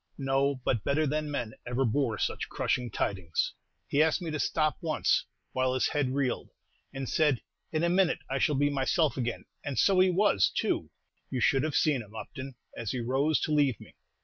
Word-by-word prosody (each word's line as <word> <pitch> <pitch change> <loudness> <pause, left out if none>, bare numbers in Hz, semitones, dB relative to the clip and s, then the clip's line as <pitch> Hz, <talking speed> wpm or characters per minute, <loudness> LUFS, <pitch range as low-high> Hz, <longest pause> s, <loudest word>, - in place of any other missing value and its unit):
No, 135 0 +1
but 115 -5 +1
better 155 +3 +2
than 150 +1 -1
man 120 -6 -3
ever 125 +2 +1
bore 115 -1 +1
such - - -2
crushing 125 -2 -1
tidings." 95 -6 -1 0.3
"He 145 - +2
asked 160 -1 +3
me 170 -3 -4
to 150 - -2
stop 155 0 +1
once, 160 -2 +1 0.3
while 130 0 +1
his 130 - +2
head 135 -3 0
reeled, 135 -3 -1 0.4
and 135 -1 -5
said, 145 -7 +2 0.3
'In 155 +1 0
a - - +4
minute 180 -1 +3
I 135 +1 -1
shall 150 +2 +2
be 145 +1 +2
myself 145 +3 +1
again,' 120 -2 -3 0.2
and 140 -2 -4
so 195 -2 +4
he 185 0 +6
was, 180 - +3
too; - - -1 0.4
you 130 - -2
should 135 +4 +3
have 155 0 -2
seen 145 -5 +3
him, 105 0 -13
Upton, 130 +3 -7 0.2
as 115 -3 -4
he 130 - -2
rose 135 +6 +1
to - - -1
leave 145 -6 +2
me. - - -14
140 Hz, 200 wpm, -29 LUFS, 125-155 Hz, 0.4 s, he